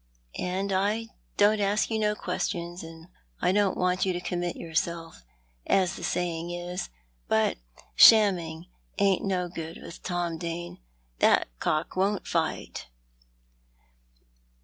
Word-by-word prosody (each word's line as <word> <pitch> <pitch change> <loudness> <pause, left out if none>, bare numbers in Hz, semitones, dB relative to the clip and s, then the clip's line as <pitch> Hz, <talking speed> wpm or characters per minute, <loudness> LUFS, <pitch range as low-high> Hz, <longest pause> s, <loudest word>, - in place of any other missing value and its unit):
I 195 +4 -1 0.3
don't 210 +1 +4
ask 205 +3 +1
you 220 - 0
no 210 -1 +1
questions, 175 -3 -3
and 165 0 -11 0.3
I - - +2
don't 200 -1 +2
want 180 0 +1
you 190 - +1
to 175 - -2
commit 175 -1 -3
yourself, 165 - -3 0.4
as 185 -2 +2
the - - -8
saying 170 -1 -2
is, 175 +1 -4 0.4
but 110 0 +2 0.4
shamming 175 -7 +6 0.3
ain't 195 -2 +2
no 185 -2 0
good 165 -2 -7
with - - -10
Tom 175 -2 -2
Dane. 170 +1 -5 0.4
That - - +4
cock 155 +1 -1
won't 195 +2 0
fight." - - -2
180 Hz, 125 wpm, -27 LUFS, 170-195 Hz, 0.4 s, shamming